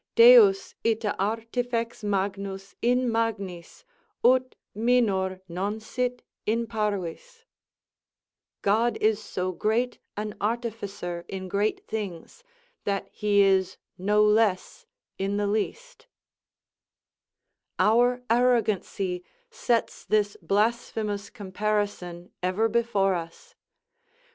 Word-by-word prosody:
Deus 460 -5 +7
ita 220 -2 0
artifex 230 +3 -2
magnus 195 -1 -2
in 250 0 +2
magnis, 200 -7 -3 0.4
ut 255 +1 +4 0.2
minor 200 -5 +1
non 195 +5 -3
sit 250 +3 -3 0.2
in 230 +2 +1
parvis: 215 - -4 1.2
"God 225 +4 +2
is 215 0 +2
so 185 -3 -3
great 225 +6 0 0.2
an 210 0 -4
artificer 205 -6 -3
in 190 -1 -6
great 200 +3 -1
things, 210 - -6 0.4
that 200 -1 -2
he 205 -1 +3
is 190 -1 +2 0.2
no 210 +3 +2
less 210 -3 +1 0.3
in 195 +1 -1
the 205 - 0
least" 340 - -3 1.7
Our 245 +3 +3
arrogancy 215 -6 +1 0.3
sets 240 - -1
this 205 0 +1
blasphemous 210 +1 -1
comparison 200 -3 -3
ever 185 +5 +1
before 225 -4 +1
us. 165 -1 -7
210 Hz, 95 wpm, -26 LUFS, 195-235 Hz, 1.7 s, Deus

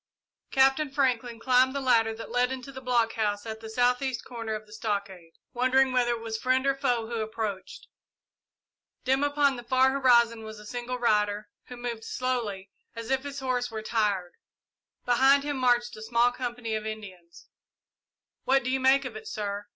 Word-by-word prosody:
Captain 270 +2 +3
Franklin 250 -4 0
climbed 255 +2 +3
the - - 0
ladder 230 -4 +3
that 225 +1 -8
led 245 +1 +2
into 265 +1 -6
the 260 -1 -9
blockhouse 225 -4 0
at 220 -1 -6
the 220 0 -9
south 245 +2 +2
east 265 -3 -3
corner 230 -3 -4
of 215 0 -7
the 210 - -16
stockade, 200 -6 -4 0.2
wondering 260 +1 +3
whether 250 -1 +2
it 230 - -5
was 225 -1 -4
friend 255 +2 +1
or 275 - +3
foe 245 -4 0
who 230 0 -3
approached. 215 -3 -5 1.2
Dim 265 +2 +2
upon 285 -2 +2
the 240 - -8
far 260 +2 +3
horizon 235 -4 +4
was 220 0 -8
a 210 - -12
single 245 +3 -4
rider, 210 -3 +1 0.2
who 250 - -10
moved 240 -2 -5
slowly, 225 -7 -3 0.2
as 230 +2 -6
if 265 -1 +2
his 280 0 -6
horse 250 -2 -1
were 220 -1 -6
tired. 205 -6 0 0.7
Behind 265 +3 +4
him 290 -1 -2
marched 245 -1 +2
a 215 - -10
small 235 +2 +2
company 240 -2 -4
of 215 0 -2
Indians. 185 -6 -9 1.0
"What 270 +1 +3
do 255 - -1
you 265 - +1
make 265 +1 +4
of 245 -4 -6
it, 215 - -8
sir?" 205 -1 -4
240 Hz, 180 wpm, -27 LUFS, 220-260 Hz, 1.2 s, horizon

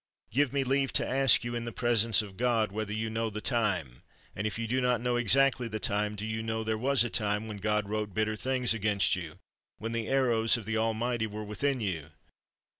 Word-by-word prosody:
Give 140 +3 +2
me 140 -1 0
leave 135 +1 +1
to - - +1
ask 135 -3 +5
you, 120 0 -4
in 120 0 -3
the 115 - -4
presence 115 -2 +2
of 100 -2 -11
God, 115 -2 +1
whether 105 0 -4
you 110 +1 -2
know 115 0 -2
the 105 0 -5
time, 100 - -1 0.3
and 100 +2 -2
if 110 - -4
you 115 - -3
do 130 +4 0
not 125 -2 +2
know 120 +1 0
exactly 125 +2 +3
the 110 -1 -4
time, 105 +1 -1
do 105 +1 -5
you 110 0 -3
know 110 0 -2
there 110 0 -1
was 130 +4 +2
a 120 - -2
time 105 0 -1
when 105 -2 -6
God 105 0 0
wrote 105 0 -3
bitter 110 0 0
things 125 +1 +1
against 105 -3 +2
you, 85 -4 -7 0.4
when 115 +1 -5
the 115 -1 -2
arrows 120 -4 +2
of 115 - -8
the 115 - -2
Almighty 115 +1 0
were 105 0 -6
within 125 +5 -1
you 85 -7 -3
110 Hz, 225 wpm, -29 LUFS, 105-120 Hz, 0.4 s, ask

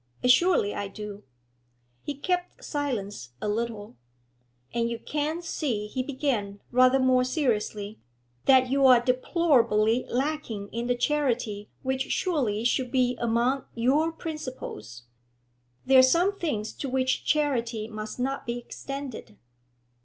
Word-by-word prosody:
'Assuredly 250 - +4
I 205 - -3
do.' 205 0 -8 0.8
He 290 - -5
kept 360 +5 -2
silence 205 - -4
a - - -3
little. 210 - -3 0.8
'And 235 0 0
you 235 - -3
can't 305 +6 -3
see,' 255 -11 -2
he 255 +5 -3
began, 255 -7 -2
rather 255 +1 +5
more 255 -1 +3
seriously, 220 -6 -1 0.5
'that 260 -1 +5
you 275 0 +5
are 250 -2 +8
deplorably 250 -3 +2
lacking 250 -6 -2
in 235 +1 -3
the 245 - +2
charity 245 -7 -1
which 265 0 -1
surely 255 - 0
should 245 +1 +1
be 250 -1 +2
among 240 +3 +1
your 275 +8 +2
principles?' 255 - -7 0.8
'There 265 0 +7
are - - +10
some 340 +10 +3
things 220 -10 -2
to 275 - -5
which 260 0 0
charity 240 -7 0
must 215 +1 -7
not 270 +1 -2
be 235 0 -2
extended.' 260 - -7
250 Hz, 130 wpm, -27 LUFS, 220-280 Hz, 0.8 s, are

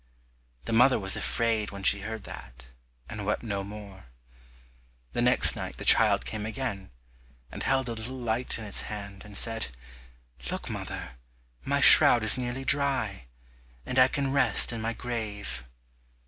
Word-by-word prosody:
The 115 - -4
mother 125 +3 +4
was 95 -2 -1
afraid 115 -2 -1
when 100 -1 -10
she 100 - +4
heard 110 +1 -7
that, 60 -5 -12 0.4
and 105 -2 -7
wept 105 +3 -3
no 100 -4 -4
more. 100 -3 -11 1.1
The - - -1
next 125 +1 +5
night - - -7
the - - -7
child - - +5
came 105 -1 -6
again, 110 -4 -5 0.6
and - - -8
held 135 -1 0
a 120 - -4
little 115 +4 -6
light 120 0 -1
in 110 - -8
its 105 - -1
hand, 100 -2 -8
and 105 -1 -7
said, 115 -1 0 0.8
"Look, - - -6
mother, 65 -1 -7 0.5
my - - -1
shroud 120 - +8
is 110 - +8
nearly 130 +1 -5
dry, 130 - 0 0.6
and 130 - -1
I 130 - +6
can 135 0 -3
rest 140 -3 +1
in 115 - -6
my 115 +1 -3
grave." 110 - -6
110 Hz, 160 wpm, -26 LUFS, 100-125 Hz, 1.1 s, shroud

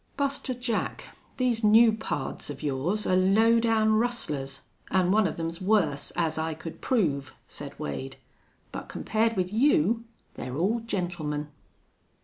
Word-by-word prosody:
"Buster 280 -2 -1
Jack, 240 -2 -3 0.2
these 245 -3 +1
new 220 +2 +7
pards 215 -13 -4
of 145 +1 -7
yours 150 +9 -1
are 185 - +2
low 215 +5 +4
down 220 -1 +3
rustlers, 150 - -1 0.3
an' 185 -1 +2
one 210 0 +4
of 160 - -5
them's 165 +2 -4
worse, 185 -8 +2
as 160 -2 0
I 160 0 -2
could 160 +1 -9
prove," 150 - 0
said - - -8
Wade, 70 -2 -5 0.6
"but - - -7
compared 225 0 0
with 185 +1 -1
you 230 - +3 0.3
they're 130 +2 -6
all 205 +8 +1
gentlemen." 170 -9 -3
190 Hz, 140 wpm, -27 LUFS, 155-225 Hz, 0.6 s, new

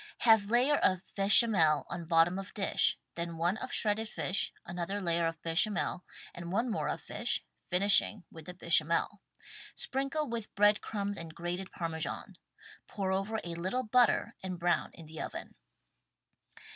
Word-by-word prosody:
Have 220 -3 +5
layer 255 +5 +3
of 185 0 +2
bechamel 195 - +5
on 170 - -6
bottom 170 +2 +3
of 195 - -9
dish 195 -3 +2
— - - -53
then 170 -1 -4
one 175 +4 +1
of - - -6
shredded 215 +1 +1
fish, 190 - -1
another 180 +3 -4
layer 170 -3 +1
of 165 -1 -4
bechamel 175 +2 0 0.3
and 170 0 -7
one 230 +5 0
more - - -2
of - - -3
fish, - - -2 0.3
finishing 200 +2 +3
with 160 -2 -12
the 180 - -8
bechamel; 170 +3 0 0.5
sprinkle 275 +3 -1
with 230 -2 -5
bread 205 +1 +4
crumbs 205 -1 -3
and 165 -1 -8
grated 175 +3 -4
Parmesan. 165 -2 -5 0.5
Pour 195 -2 -3
over 195 +4 -1
a 170 - -5
little 185 +10 -2
butter 235 0 +3
and 185 -2 -5
brown 175 +1 +1
in 165 - -12
the 160 +1 -8
oven. - - -7
190 Hz, 160 wpm, -31 LUFS, 170-215 Hz, 0.5 s, Have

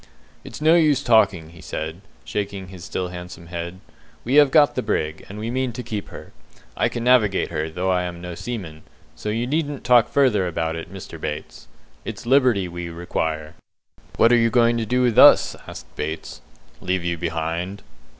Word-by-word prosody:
"It's - - -10
no 160 +2 +5
use 150 -5 +3
talking," 100 - +3
he 85 -1 -14
said, 80 +4 -5 0.2
shaking 100 -2 -4
his 90 -2 -11
still 90 -1 -3
handsome 90 -1 -9
head. 85 +1 -6 0.4
"We 125 - -2
have 145 - +3
got 145 0 +5
the - - -1
brig, 75 +1 -2
and 100 - -8
we 110 +2 -4
mean 130 -1 -1
to 125 +1 -6
keep 110 -3 -5
her. - - -11 0.4
I - - +1
can 120 - -4
navigate 120 -6 +3
her, 80 +1 -2
though 90 +4 -1
I 90 -1 +2
am 85 -1 -6
no 90 0 -7
seaman, 85 -6 -6 0.3
so 105 - -5
you 115 +3 -1
needn't 145 0 -2
talk 120 -1 +5
further 120 -10 +2
about 80 -1 -2
it, 80 +2 -7
Mr. 90 -4 -9
Bates. 75 -5 -6 0.4
It's - - -7
liberty 125 -7 +3
we 85 0 -6
require." 80 -2 -3 0.6
"What 115 - +5
are 120 - +6
you 115 - +3
going 120 0 +3
to 110 - -3
do 125 +3 +2
with 120 -3 +3
us?" - - +7
asked - - -9
Bates. 80 +2 -5 0.4
"Leave 90 -1 -1
you 85 0 -1
behind." 85 +3 -3
95 Hz, 190 wpm, -22 LUFS, 85-120 Hz, 0.6 s, us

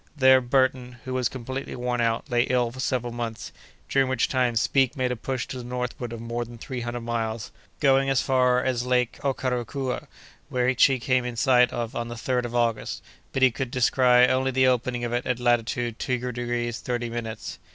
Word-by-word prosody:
There 130 -1 +6
Burton, 125 -1 +1
who 130 - -4
was 125 -2 +1
completely 130 +2 -6
worn 125 -1 -1
out, 115 +2 0
lay 120 -2 +2
ill 125 -2 +2
for 130 - -11
several 125 -2 -1
months, 115 -2 -5 0.4
during 135 -1 +2
which 130 -2 +1
time 125 -3 +1
Speke 135 +4 +2
made 130 -1 0
a - - -1
push 130 +2 -3
to 130 - -6
the - - -7
northward 125 -1 -4
of 115 - -6
more 115 +1 -3
than 120 0 -11
three 125 +2 -6
hundred 120 0 -4
miles, 115 -1 -3 0.3
going 135 -1 +3
as 135 -2 +3
far 125 -1 +2
as 125 -2 0
Lake 125 -1 0
Okeracua, 130 -1 -2 0.4
which 125 0 +3
he 135 -2 +2
came 130 +1 +1
in 125 -1 -4
sight 125 0 +4
of 120 -2 -4
on 120 0 -2
the 120 - -6
3d 125 +1 -1
of 120 0 -5
August; 115 -2 -1 0.3
but 135 - 0
he 130 - +6
could 125 +2 -4
descry 125 0 +4
only 130 +1 +1
the 130 0 +3
opening 125 -1 +1
of 120 0 -2
it 120 +1 -1
at 125 -1 0
latitude 120 -1 0
two 125 -1 0
degrees 120 -1 -2
thirty 120 -1 -2
minutes. 115 -2 -6
125 Hz, 205 wpm, -25 LUFS, 120-130 Hz, 0.4 s, There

